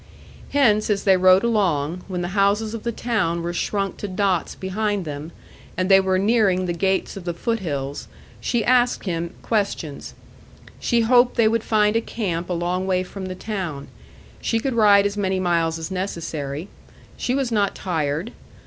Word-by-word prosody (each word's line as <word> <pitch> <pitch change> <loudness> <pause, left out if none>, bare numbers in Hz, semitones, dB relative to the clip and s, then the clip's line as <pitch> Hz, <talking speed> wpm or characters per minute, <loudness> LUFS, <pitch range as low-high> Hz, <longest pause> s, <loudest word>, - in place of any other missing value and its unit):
Hence, 220 -7 +3
as 200 -2 +1
they 195 -2 +5
rode 185 +1 +5
along, 180 -8 +1
when 180 -2 -3
the 175 - -3
houses 205 +3 +1
of 230 - -5
the 235 - -2
town 210 -8 -1
were 175 0 -3
shrunk 195 +2 -2
to 205 - -5
dots 190 -2 0
behind 205 0 -2
them, 150 +2 -6 0.5
and 185 +1 0
they 195 0 +8
were 190 -1 +1
nearing 195 -3 +2
the 175 - -1
gates 190 +3 0
of 195 - -7
the 175 -1 -3
foot 230 +6 -1
hills, 140 -6 -4 0.3
she 240 -2 -1
asked 245 0 +3
him 170 -1 -3
questions. 200 -9 -2 0.6
She 235 -2 +2
hoped 245 +2 +4
they 230 -2 +4
would 225 0 +1
find 210 -1 +2
a 230 - +3
camp 180 -7 -3
a - - 0
long 175 +2 -1
way 185 -1 +1
from 190 +1 -7
the 185 - -5
town. 180 -9 -5 0.5
She 225 - 0
could 265 +3 -2
ride 205 -3 +5
as 205 0 -1
many 190 -2 0
miles 170 -3 +1
as 165 +3 -6
necessary. 165 -5 -4 0.5
She 250 - -1
was 270 -3 -1
not 205 -3 +1
tired. 160 +2 -2
190 Hz, 180 wpm, -22 LUFS, 175-215 Hz, 0.6 s, they